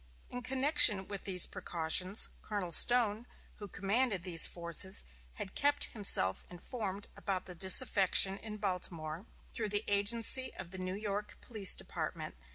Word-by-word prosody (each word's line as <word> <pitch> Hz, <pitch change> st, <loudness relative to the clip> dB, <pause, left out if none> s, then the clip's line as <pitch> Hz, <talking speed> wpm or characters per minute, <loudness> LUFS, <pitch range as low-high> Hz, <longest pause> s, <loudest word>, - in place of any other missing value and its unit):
In 245 Hz, -, -9 dB
connection 265 Hz, -6 st, +4 dB
with 200 Hz, -1 st, -10 dB
these 185 Hz, -3 st, +4 dB
precautions, 180 Hz, +4 st, -3 dB
Colonel 205 Hz, -5 st, -8 dB
Stone, 235 Hz, +2 st, +3 dB, 0.3 s
who 205 Hz, -, -11 dB
commanded 200 Hz, +1 st, -4 dB
these 175 Hz, -3 st, +7 dB
forces, 170 Hz, +2 st, 0 dB, 0.3 s
had 190 Hz, -, -10 dB
kept 290 Hz, 0 st, -2 dB
himself 195 Hz, -, 0 dB
informed 200 Hz, +2 st, -8 dB
about 190 Hz, -2 st, -7 dB
the 180 Hz, -, -12 dB
disaffection 195 Hz, +1 st, +3 dB
in 215 Hz, -1 st, -11 dB
Baltimore, 180 Hz, -3 st, -7 dB, 0.3 s
through 215 Hz, -2 st, -7 dB
the 205 Hz, +1 st, -3 dB
agency 225 Hz, +5 st, +1 dB
of 175 Hz, -, -12 dB
the 185 Hz, -, -8 dB
New 185 Hz, 0 st, -7 dB
York 205 Hz, 0 st, -8 dB
police 215 Hz, -6 st, +2 dB
department. -, -, -8 dB
200 Hz, 140 wpm, -29 LUFS, 185-220 Hz, 0.3 s, these